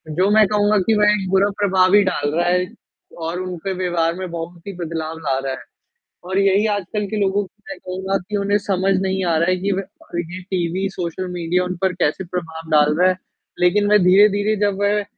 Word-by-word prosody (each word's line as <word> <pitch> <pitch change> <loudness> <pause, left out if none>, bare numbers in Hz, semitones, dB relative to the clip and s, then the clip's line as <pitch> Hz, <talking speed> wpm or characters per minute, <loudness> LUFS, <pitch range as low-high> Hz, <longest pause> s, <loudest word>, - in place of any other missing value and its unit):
जो 185 +4 +2
मैं 215 0 +6
कहूँगा 210 +1 +2
कि 225 - +4
वह 210 0 +5
एक 195 -3 -2
बुरा 195 +1 +3
प्रभाव 185 -2 +3
भी 205 0 +6
डाल 145 -5 -1
रहा 175 - +1
है 180 0 +1 0.6
और 175 +2 -3
उनके 185 +1 -4
व्यवहार 170 -2 0
में 185 0 -5
बहुत 170 +2 -7
ही 200 - -5
बदलाव 160 -1 -4
ला 140 -4 -1
रहा 135 0 -3
है - - -6 0.7
और 190 +2 -1
यही 200 +1 +3
आजकल 205 +1 -3
के 215 - -3
लोगों 200 +1 +1
की 210 +3 -24
मैं 290 - -6
कहूँगा 190 +1 -2
कि 210 - -2
उन्हें 200 0 +1
समझ 195 0 +1
नहीं 190 0 -1
आ 170 -2 +1
रहा 170 +3 +2
है 185 - +3
कि 200 +1 0
वह 195 - -2 0.3
और 170 - -3
ये 175 +2 -6
टीवी 185 +1 -1
सोशल 180 0 -4
मीडिया 175 +1 0
उन 180 0 -3
पर 190 -1 +2
कैसे 150 +6 0
प्रभाव 165 -2 -6
डाल 150 0 +4
रहा 185 +1 +5
है 185 - -1 0.4
लेकिन 190 +4 +3
वह 210 - +7
धीरे-धीरे 205 +2 +4
जब 200 -1 -1
वह 205 +1 +2
185 Hz, 220 wpm, -20 LUFS, 170-200 Hz, 0.7 s, वह